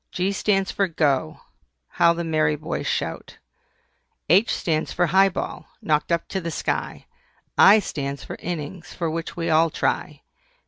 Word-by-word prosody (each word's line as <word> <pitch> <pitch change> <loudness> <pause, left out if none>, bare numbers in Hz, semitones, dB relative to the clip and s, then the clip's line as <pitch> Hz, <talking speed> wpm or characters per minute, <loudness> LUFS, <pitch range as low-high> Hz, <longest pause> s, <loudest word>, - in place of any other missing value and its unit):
G 185 +2 0
stands 195 -1 0
for 200 - 0
"GO" 145 - 0 0.5
How 170 - +3
the 170 0 -4
merry 155 -2 +1
boys 150 - -4
shout! - - -3 0.9
H 195 +7 +5
stands 155 -2 -1
for 175 - +1
HIGH 190 +4 +4
BALL, - - -5
knocked 150 +1 0
up 170 0 0
to 190 - -2
the 170 - -4
sky. 160 - -3 0.5
I 205 +2 +8
stands 140 -8 -4
for - - -7
INNINGS, 170 0 -6
for 165 -2 -2
which 165 +1 -5
we 165 -1 -1
all 160 +1 +4
try. - - -2
165 Hz, 155 wpm, -23 LUFS, 155-185 Hz, 0.9 s, I